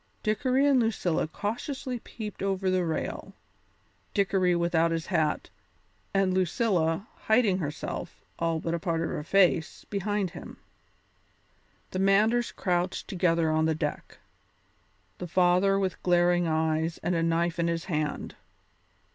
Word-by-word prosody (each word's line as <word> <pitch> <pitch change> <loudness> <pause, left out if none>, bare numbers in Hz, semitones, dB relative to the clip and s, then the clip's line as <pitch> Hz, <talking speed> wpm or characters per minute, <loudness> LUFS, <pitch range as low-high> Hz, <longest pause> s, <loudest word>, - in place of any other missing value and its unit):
Dickory 255 +6 +2
and 280 -2 +4
Lucilla 200 -9 0
cautiously 245 - -4
peeped 215 -2 -8
over 195 -1 0
the 185 -1 +2
rail, 160 -2 -4 0.8
Dickory 190 -3 +2
without 170 -1 +2
his 165 -1 -2
hat, 155 - 0 0.6
and 195 -1 +2
Lucilla, 185 -1 +1 0.2
hiding 220 -4 +3
herself, 150 -3 -5 0.2
all 165 -1 0
but 165 +1 -3
a 170 - -1
part 165 0 -1
of 165 - -2
her 150 - -4
face, 175 -2 +2
behind 205 -2 -1
him; - - -10 1.3
the 185 - -3
Manders 215 +5 +3
crouched 180 0 -1
together 170 -4 +1
on 155 0 +2
the 160 0 +1
deck, 150 -1 -4 1.0
the 180 - -5
father 180 +3 +3
with 190 -2 -2
glaring 175 -1 +3
eyes 160 +1 0
and 175 +2 0
a 165 - +1
knife 165 +1 0
in 170 - +2
his 170 0 -2
hand. 155 -5 -3
180 Hz, 135 wpm, -28 LUFS, 165-195 Hz, 1.3 s, and